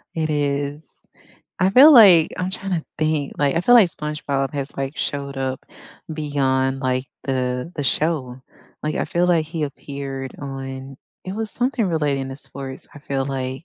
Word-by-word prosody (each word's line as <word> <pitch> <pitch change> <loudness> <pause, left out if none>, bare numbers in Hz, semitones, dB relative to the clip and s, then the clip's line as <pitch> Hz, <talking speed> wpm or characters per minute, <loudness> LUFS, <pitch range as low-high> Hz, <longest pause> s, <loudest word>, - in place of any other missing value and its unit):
It 160 -1 -1
is, 145 0 -1 0.7
I 185 0 +3
feel 275 +9 +9
like 190 - +8
I'm 185 +1 -2
trying 195 0 -4
to - - -21
think, 155 -2 0
like, 145 +1 +1
I - - +3
feel 245 +7 +5
like, 210 -8 +7
SpongeBob 150 -3 -3
has, 140 -1 -4
like, 135 +2 -3
showed 140 -1 -3
up 130 -1 -3 0.5
beyond, 135 -3 0
like, 130 -1 0 0.2
the 130 +3 -2
the 145 - -3
show. 135 -4 0 0.4
Like, 155 0 -2
I - - 0
feel 175 +1 +1
like, 165 -3 +2
he 160 0 -4
appeared 140 -2 -6
on 135 -1 -7 0.3
it 185 - -5
was 220 -1 -3
something 250 -3 0
relating 145 -6 0
to 135 - -7
sports, 135 -1 -9
I - - -10
feel 135 -2 -2
like 135 +1 -4
145 Hz, 170 wpm, -22 LUFS, 135-165 Hz, 0.7 s, feel